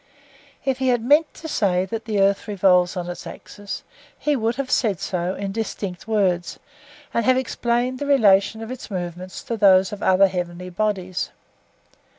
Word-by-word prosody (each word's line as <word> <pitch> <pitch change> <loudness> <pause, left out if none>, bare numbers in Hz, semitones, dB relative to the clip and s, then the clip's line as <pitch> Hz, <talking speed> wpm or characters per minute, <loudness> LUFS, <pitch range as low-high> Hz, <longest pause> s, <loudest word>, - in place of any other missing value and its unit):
If 265 -1 0
he 260 - 0
had 245 -3 +2
meant 295 +5 +4
to 320 - -8
say 185 - +1
that 225 +3 -5
the 215 -2 -1
earth 195 +2 +2
revolves 185 -3 +3
on 175 -1 -3
its 175 - -7
axis, 205 -1 -8 0.3
he 300 -1 0
would 230 -2 0
have 270 0 -4
said 205 - +1
so 180 0 -2
in 195 0 -4
distinct 200 -3 -5
words, 190 -5 0 0.6
and 235 - +1
have 255 +3 +4
explained 245 0 -1
the 285 - -3
relation 220 -5 +4
of 225 - -7
its 255 -2 -8
movements 180 -1 -6
to 230 - -3
those 190 -2 +5
of 205 - -6
the - - -2
other 190 +1 +6
heavenly 180 -1 -5
bodies. 185 -2 -2
200 Hz, 175 wpm, -22 LUFS, 185-235 Hz, 0.6 s, other